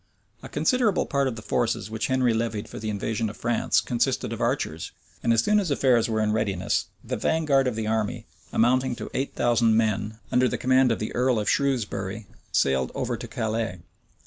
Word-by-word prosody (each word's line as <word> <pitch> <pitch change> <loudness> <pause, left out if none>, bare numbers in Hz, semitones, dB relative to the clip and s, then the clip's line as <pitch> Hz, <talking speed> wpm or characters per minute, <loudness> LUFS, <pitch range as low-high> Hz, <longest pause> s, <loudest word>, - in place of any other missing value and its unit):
A - - -9
considerable 245 -7 +2
part 140 -1 0
of 125 - -3
the 110 - -9
forces 110 -2 -1
which 110 - -2
Henry 130 -2 +2
levied 110 -2 -2
for - - -8
the 110 0 -4
invasion 110 +2 -2
of 105 - -10
France 120 -1 +1
consisted 120 -1 -1
of - - -6
archers; 80 +1 -2 0.3
and 115 - +1
as 115 -1 +3
soon 210 - +3
as 190 -5 -1
affairs 125 -5 +3
were 110 -1 0
in 105 0 +1
readiness, 100 -4 0 0.2
the - - -3
vanguard 145 -5 +2
of 125 - -1
the 110 -1 -2
army, 110 -1 -1 0.3
amounting 125 +2 +2
to - - -7
eight 135 +1 -2
thousand 115 -2 +3
men, 110 -1 0
under 125 +1 +4
the - - -2
command 130 0 +3
of 115 - +1
the 110 - -4
earl 125 -1 +2
of 105 -1 -2
Shrewsbury, 110 -7 -1 0.3
sailed 65 -1 +1
over - - -1
to - - -7
Calais. 110 -4 -2
115 Hz, 200 wpm, -25 LUFS, 110-130 Hz, 0.3 s, under